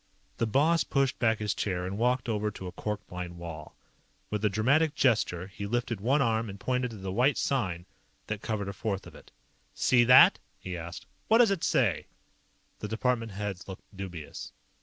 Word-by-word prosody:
The 115 Hz, -, 0 dB
boss 150 Hz, +7 st, +3 dB
pushed 135 Hz, -2 st, 0 dB
back 115 Hz, -2 st, +3 dB
his 105 Hz, -1 st, -1 dB
chair 90 Hz, -3 st, -2 dB
and 95 Hz, +2 st, -4 dB
walked 125 Hz, +3 st, +1 dB
over 105 Hz, -2 st, 0 dB
to 95 Hz, -, -9 dB
a 90 Hz, -, -5 dB
cork 105 Hz, +2 st, -4 dB
lined 90 Hz, -1 st, -6 dB
wall. 80 Hz, -3 st, -8 dB, 0.6 s
With 105 Hz, 0 st, -2 dB
a 105 Hz, -, +4 dB
dramatic 140 Hz, +10 st, +2 dB
gesture, 110 Hz, -10 st, +2 dB
he 100 Hz, +1 st, -7 dB
lifted 120 Hz, -2 st, -2 dB
one 135 Hz, +6 st, +3 dB
arm 115 Hz, -1 st, 0 dB
and 100 Hz, 0 st, -8 dB
pointed 125 Hz, +1 st, -1 dB
to 110 Hz, -, -9 dB
the 95 Hz, -1 st, -5 dB
white 125 Hz, +8 st, +2 dB
sign 90 Hz, -11 st, -1 dB, 0.4 s
that 105 Hz, -1 st, -4 dB
covered 105 Hz, -3 st, -3 dB
a 100 Hz, -, -4 dB
fourth 100 Hz, -1 st, -3 dB
of -, -, -12 dB
it. -, -, -15 dB, 0.5 s
"See 120 Hz, -2 st, +4 dB
that?" 125 Hz, +1 st, +8 dB, 0.2 s
he 90 Hz, -1 st, -6 dB
asked. 85 Hz, +1 st, -7 dB, 0.2 s
"What 225 Hz, -, +5 dB
does 235 Hz, -4 st, +5 dB
it 195 Hz, -4 st, -1 dB
say?" 105 Hz, -, +1 dB, 0.7 s
The 105 Hz, -, -4 dB
department 115 Hz, 0 st, -1 dB
heads 100 Hz, -1 st, -5 dB
looked 95 Hz, -1 st, -8 dB
dubious. 90 Hz, -5 st, -7 dB
105 Hz, 190 wpm, -29 LUFS, 95-125 Hz, 0.7 s, that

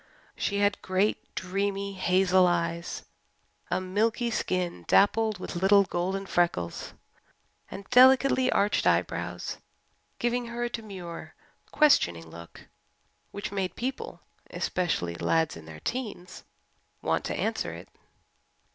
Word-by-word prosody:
She 200 Hz, -, -1 dB
had 205 Hz, 0 st, +1 dB
great, 190 Hz, +3 st, +1 dB, 0.2 s
dreamy, 200 Hz, +1 st, -2 dB
hazel 185 Hz, 0 st, +3 dB
eyes, 170 Hz, -1 st, -2 dB, 0.7 s
a -, -, +1 dB
milky 220 Hz, +6 st, 0 dB
skin 180 Hz, -, -2 dB
dappled 215 Hz, +1 st, +3 dB
with 180 Hz, -, -7 dB
little 195 Hz, +3 st, +5 dB
golden 190 Hz, +2 st, -2 dB
freckles, 170 Hz, -, -1 dB, 0.8 s
and 195 Hz, 0 st, -9 dB
delicately 260 Hz, +1 st, +6 dB
arched 205 Hz, +1 st, +2 dB
eyebrows, -, -, -1 dB, 0.6 s
giving 240 Hz, 0 st, -1 dB
her 235 Hz, +1 st, -4 dB
a 240 Hz, -, -1 dB
demure, 190 Hz, -7 st, -7 dB, 0.3 s
questioning 85 Hz, -, +3 dB
look 85 Hz, 0 st, -12 dB, 0.6 s
which 200 Hz, 0 st, -6 dB
made 195 Hz, -2 st, -2 dB
people, 260 Hz, +2 st, -5 dB, 0.3 s
especially 165 Hz, -, -1 dB
lads 160 Hz, -, 0 dB
in 80 Hz, -1 st, -11 dB
their 80 Hz, -1 st, -10 dB
teens, 210 Hz, -8 st, -5 dB, 0.6 s
want -, -, 0 dB
to -, -, -2 dB
answer -, -, -1 dB
it. -, -, -10 dB
195 Hz, 115 wpm, -28 LUFS, 175-220 Hz, 0.8 s, delicately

